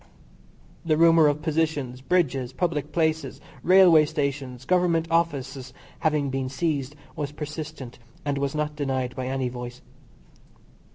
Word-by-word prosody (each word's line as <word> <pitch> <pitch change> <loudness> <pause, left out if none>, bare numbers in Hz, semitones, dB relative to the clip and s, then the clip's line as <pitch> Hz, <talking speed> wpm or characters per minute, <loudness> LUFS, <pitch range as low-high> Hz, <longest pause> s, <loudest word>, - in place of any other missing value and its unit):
The 155 -2 +1
rumour 165 -1 +6
of 145 +1 0
positions, 150 -6 -1
bridges, 135 -6 0
public 150 -2 -2
places, 160 -3 0 0.2
railway 175 -2 +6
stations, 140 -4 -3
Government 175 -2 +2
offices, 135 -6 -1 0.3
having 150 -3 +1
been 130 -1 -2
seized 140 -1 -2 0.2
was 145 -1 -3
persistent, 150 -4 -7 0.3
and 140 -1 -1
was 140 +1 -2
not 150 0 -2
denied 130 -3 -2
by 130 -1 -4
any 130 -1 -1
voice. 125 0 -7
145 Hz, 125 wpm, -25 LUFS, 130-160 Hz, 0.3 s, rumour